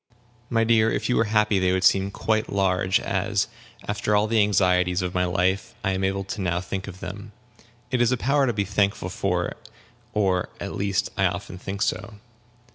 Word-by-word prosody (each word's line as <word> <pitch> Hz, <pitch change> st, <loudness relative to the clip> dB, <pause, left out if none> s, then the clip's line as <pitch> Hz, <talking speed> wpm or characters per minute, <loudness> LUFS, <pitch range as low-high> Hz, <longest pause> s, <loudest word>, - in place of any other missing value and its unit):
"My 115 Hz, -1 st, +2 dB
dear, 110 Hz, -1 st, +4 dB
if -, -, -2 dB
you 125 Hz, -, +2 dB
were 115 Hz, -, +3 dB
happy, 105 Hz, -1 st, +2 dB
they 90 Hz, -1 st, +2 dB
would 95 Hz, 0 st, 0 dB
seem 95 Hz, +1 st, +4 dB
quite 110 Hz, +2 st, -1 dB
large, 95 Hz, -1 st, +2 dB
as, 100 Hz, +1 st, 0 dB, 0.4 s
after 105 Hz, 0 st, 0 dB
all 105 Hz, +1 st, +3 dB
the 110 Hz, 0 st, +2 dB
anxieties 90 Hz, -2 st, +2 dB
of 90 Hz, 0 st, -3 dB
my 90 Hz, 0 st, +1 dB
life, 95 Hz, +2 st, 0 dB
I 95 Hz, -, +1 dB
am 95 Hz, 0 st, -1 dB
able 95 Hz, 0 st, -1 dB
now 90 Hz, -3 st, 0 dB
to 90 Hz, -, -1 dB
think 95 Hz, +2 st, -4 dB
them. 100 Hz, +2 st, -8 dB, 0.6 s
It 125 Hz, -2 st, +1 dB
is 120 Hz, 0 st, +3 dB
a 125 Hz, -, +2 dB
power 140 Hz, +3 st, +2 dB
to 120 Hz, -, +1 dB
be 100 Hz, -2 st, -1 dB
thankful 100 Hz, 0 st, 0 dB
for, -, -, -1 dB, 0.6 s
or, 95 Hz, -4 st, +1 dB
at -, -, -5 dB
least, 100 Hz, +1 st, -1 dB
I 95 Hz, -, +3 dB
often 90 Hz, 0 st, -5 dB
think 100 Hz, +1 st, -3 dB
so. 100 Hz, +4 st, -2 dB
100 Hz, 195 wpm, -24 LUFS, 95-105 Hz, 0.6 s, dear